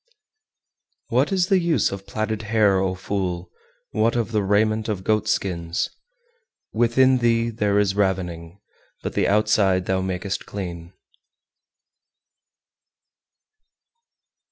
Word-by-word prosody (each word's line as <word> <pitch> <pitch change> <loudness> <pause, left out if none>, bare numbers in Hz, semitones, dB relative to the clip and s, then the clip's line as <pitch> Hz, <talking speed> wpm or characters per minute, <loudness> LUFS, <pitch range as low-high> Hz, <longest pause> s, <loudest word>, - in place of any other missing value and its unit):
394. - - -2
What - - +1
is 185 -2 +2
the 195 -2 +4
use 170 - +1
of 100 0 -7
platted 110 0 -2
hair, 105 -3 +2
O 95 -1 0
fool! 95 -2 -3 0.4
what 110 +2 +1
of 115 -1 -1
the 105 -2 +1
raiment 110 +2 +1
of 95 -3 -3
goat 110 +1 +1
skins? 85 -5 -1 0.8
Within 125 +3 +3
thee 115 -1 +2
there 105 -2 0
is 100 -2 +2
ravening, 90 -3 -2 0.4
but - - -3
the - - +1
outside 100 -3 +2
thou 95 0 0
makest 95 +1 -3
clean. 85 -3 -6
100 Hz, 115 wpm, -23 LUFS, 95-110 Hz, 0.8 s, the